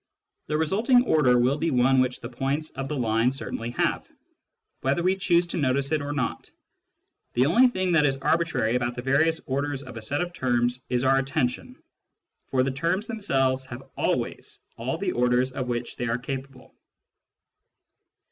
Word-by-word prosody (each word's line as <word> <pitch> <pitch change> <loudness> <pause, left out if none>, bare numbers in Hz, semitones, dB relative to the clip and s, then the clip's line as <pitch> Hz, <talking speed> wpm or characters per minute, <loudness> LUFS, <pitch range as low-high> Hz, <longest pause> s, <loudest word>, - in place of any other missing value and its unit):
The 150 - 0
resulting 220 - +3
order 130 - +4
will 130 +4 +2
be 165 +2 0
one 130 0 +3
which 125 -1 -1
the 120 - -6
points 135 +5 -2
of 135 0 -5
the 150 - -3
line 115 0 +2
certainly 120 -3 -5
have, - - 0 0.7
whether 140 +6 0
we 185 +1 +3
choose 175 -2 +2
to 170 - -5
notice 140 -1 +1
it 155 -2 +1
or 145 0 -4
not; 135 -5 -3 0.8
the 125 +2 +3
only 235 - +5
thing 185 -6 -1
that 155 -3 +4
is 135 -1 0
arbitrary 140 -6 +1
about 120 -1 -1
the 125 - -6
various 160 +5 +2
orders 140 +1 -2
of 130 -3 -10
a - - -6
set 140 +8 -1
of 175 0 -7
terms 125 -2 0
is 125 0 +1
our 135 0 +4
attention, 135 -2 -2 0.7
for 130 -1 +1
the 135 - 0
terms 170 +9 -1
themselves 135 - 0
have 120 -2 -10
always - - -2 0.2
all 130 +6 -3
the 185 +1 -1
orders 125 0 +1
of 130 -1 -4
which 120 0 -3
they 120 - -2
are 115 +1 0
capable. 135 0 -7
135 Hz, 175 wpm, -25 LUFS, 125-160 Hz, 0.8 s, only